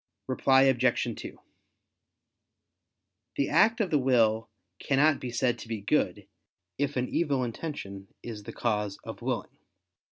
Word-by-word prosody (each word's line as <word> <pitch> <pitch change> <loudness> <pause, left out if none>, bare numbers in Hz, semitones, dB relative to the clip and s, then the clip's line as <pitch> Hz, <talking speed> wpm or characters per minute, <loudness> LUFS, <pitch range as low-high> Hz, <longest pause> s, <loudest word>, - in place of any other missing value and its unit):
Reply 130 +1 +4
Obj. 130 -3 +2
2: - - -9 2.0
The 140 - 0
act 225 +2 +4
of 200 -6 0
the 150 - +4
will 115 -4 +2 0.3
cannot 145 +2 +3
be 125 - -5
said 120 0 0
to - - -9
be 110 -2 -4
good, 105 -3 0 0.5
if 145 -1 -1
an 125 0 0
evil 140 -6 0
intention 110 -7 -6 0.2
is 110 -3 -6
the - - -8
cause 105 -4 -1
of - - -8
willing. - - -3
125 Hz, 135 wpm, -28 LUFS, 110-140 Hz, 2.0 s, Reply